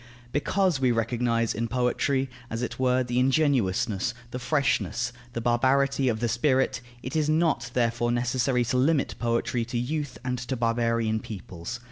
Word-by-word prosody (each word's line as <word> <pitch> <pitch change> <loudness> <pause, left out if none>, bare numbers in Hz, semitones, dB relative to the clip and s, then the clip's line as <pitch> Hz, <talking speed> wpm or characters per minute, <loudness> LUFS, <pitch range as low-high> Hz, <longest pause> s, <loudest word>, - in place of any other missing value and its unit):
Because 180 +2 +1
we 130 -2 +3
recognize 115 0 0
in 115 +2 -2
poetry, 130 +2 +1 0.2
as 115 +2 -3
it 115 0 -4
were, 130 0 +3
the 120 0 -1
ingenuousness, 120 -6 +1 0.2
the 125 - -4
freshness, 120 - 0 0.2
the 115 - -3
barbarity 130 +3 +2
of 110 -1 -2
the 120 - +2
spirit, 130 +2 +1 0.2
it 130 - -5
is 155 -1 +1
not 160 +1 +1
therefore 120 -1 +1
necessary 125 +1 +1
to 125 +2 0
limit 140 +3 +2
poetry 115 0 0
to 120 +1 -3
youth 140 +2 -2
and 125 -1 -1
to 125 +2 -3
barbarian 115 -1 +1
peoples. 95 +1 -7
125 Hz, 155 wpm, -26 LUFS, 115-130 Hz, 0.2 s, we